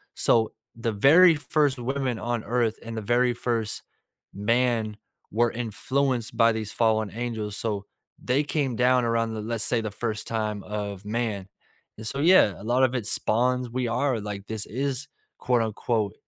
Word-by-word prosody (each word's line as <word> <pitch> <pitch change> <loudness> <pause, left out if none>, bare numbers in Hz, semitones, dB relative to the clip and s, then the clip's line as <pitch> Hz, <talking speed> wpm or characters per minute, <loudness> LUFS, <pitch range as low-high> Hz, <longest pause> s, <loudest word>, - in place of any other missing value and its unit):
So, 110 -2 +3 0.2
the 115 0 -2
very 160 - +6
1st 145 -2 +1
women 130 -1 -2
on 120 -2 -2
earth 115 0 0
and 115 -1 -7
the - - -2
very 120 +3 +2
1st 115 -3 -2 0.5
man 115 0 0 0.3
were 120 +2 +2
influenced 125 +2 -1
by 115 0 +5
these 110 -1 -4
fallen 110 -3 +1
angels, 110 -2 -4
so 105 -3 -2 0.4
they 135 +4 +2
came 140 -4 -1
down 125 0 +3
around, 115 -2 -1
let's 115 -2 0
say, 115 -2 +2
the 110 -1 -4
first 110 -1 -4
time 110 -2 -2
of 100 -2 -5
man. 105 -3 -2 0.5
And 110 0 -6
so, 135 - -2
yeah 160 - +5
a - - -10
lot 125 +3 +2
of 130 0 +2
it 120 - -2
spawns, 125 +3 +1
we 125 0 -2
are 125 0 0
like, 100 -1 -6
this 110 -1 -3
is 135 +3 -3 0.3
quote 125 -2 +2
unquote 110 -2 -1
115 Hz, 165 wpm, -26 LUFS, 110-125 Hz, 0.5 s, very